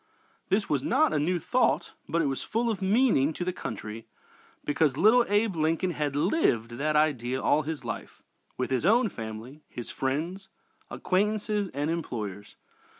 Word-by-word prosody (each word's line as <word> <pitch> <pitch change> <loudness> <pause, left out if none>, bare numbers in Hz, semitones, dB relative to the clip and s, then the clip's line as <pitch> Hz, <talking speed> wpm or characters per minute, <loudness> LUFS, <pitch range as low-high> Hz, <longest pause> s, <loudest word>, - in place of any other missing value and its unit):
This 200 +1 +1
was 140 -3 +1
not - - +2
a 150 - +2
new 175 +5 +1
thought, 255 +9 +1 0.2
but 165 +1 +1
it - - 0
was 135 -1 -1
full 230 +1 0
of 200 - -4
meaning 190 - +3
to 175 - -4
the 185 - -1
country 110 -6 -6 0.6
because 145 -2 +1
little 235 +6 +5
Abe 205 -1 +2
Lincoln 165 +3 +1
had 150 -3 -2
lived 145 - +1
that 150 +1 0
idea 130 -5 +1
all 145 +3 +3
his 155 -3 -5
life, 115 - -6 0.3
with 130 - -2
his 130 0 +1
own 225 +5 +4
family, 115 - -8
his 120 - -7
friends, 165 +9 -3 0.4
acquaintances, 210 +1 0
and 145 +3 0
employers. 105 - -5
155 Hz, 160 wpm, -28 LUFS, 130-195 Hz, 0.6 s, little